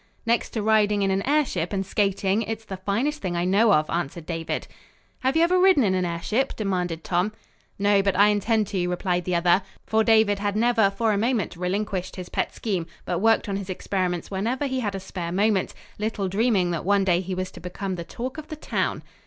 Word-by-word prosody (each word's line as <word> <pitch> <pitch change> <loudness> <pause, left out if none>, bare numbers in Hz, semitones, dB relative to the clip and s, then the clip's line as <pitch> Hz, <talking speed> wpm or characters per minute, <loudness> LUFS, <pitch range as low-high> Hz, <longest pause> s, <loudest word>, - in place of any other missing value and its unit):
"Next 230 +1 +1
to 220 - -2
riding 210 -1 +3
in 195 - +2
an 190 +1 +1
airship 265 - +1
and 195 -1 -1
skating, 200 +1 +1
it's 225 0 -4
the 195 - -5
finest 230 +11 -1
thing 175 -2 -2
I 175 +1 0
know 205 +4 +4
of," 155 -5 +3
answered 170 -1 -3
David. 165 -1 -3 0.5
"Have 265 +4 +1
you 330 - +5
ever 365 +2 +3
ridden 370 -7 +5
in 195 -3 +2
an 185 -1 +1
airship?" 210 +10 -1
demanded 180 -5 -2
Tom. 180 +4 0 0.4
"No, 200 0 +3
but 195 -2 0
I 205 +1 +6
intend 215 +1 +1
to," 180 -3 -1
replied 180 -1 -1
the 180 - 0
other; 175 +2 +4 0.2
for 220 0 +2
David 220 -3 +4
had 205 0 -1
never 225 -2 +3
for 215 +2 0
a 200 - 0
moment 225 -5 0
relinquished 185 +1 -2
his 180 -1 -7
pet - - -1
scheme, 185 -7 -2 0.2
but 175 - -1
worked 225 +2 +3
on 195 -1 -1
his 200 -1 -6
experiments 185 -2 -2
whenever 230 +9 -1
he 260 -1 -1
had 205 -5 -2
a - - -3
spare 180 -2 -5
moment; 200 +1 +1 0.2
little 210 -2 -1
dreaming 195 -2 +2
that 170 - -2
one 200 +1 +3
day 180 -2 +2
he 185 0 -4
was 185 0 -3
to - - -11
become 185 +2 -5
the 170 -2 -4
talk 255 - -6
of 310 - -9
the 310 - -6
town. 305 - -2
200 Hz, 220 wpm, -25 LUFS, 180-220 Hz, 0.5 s, I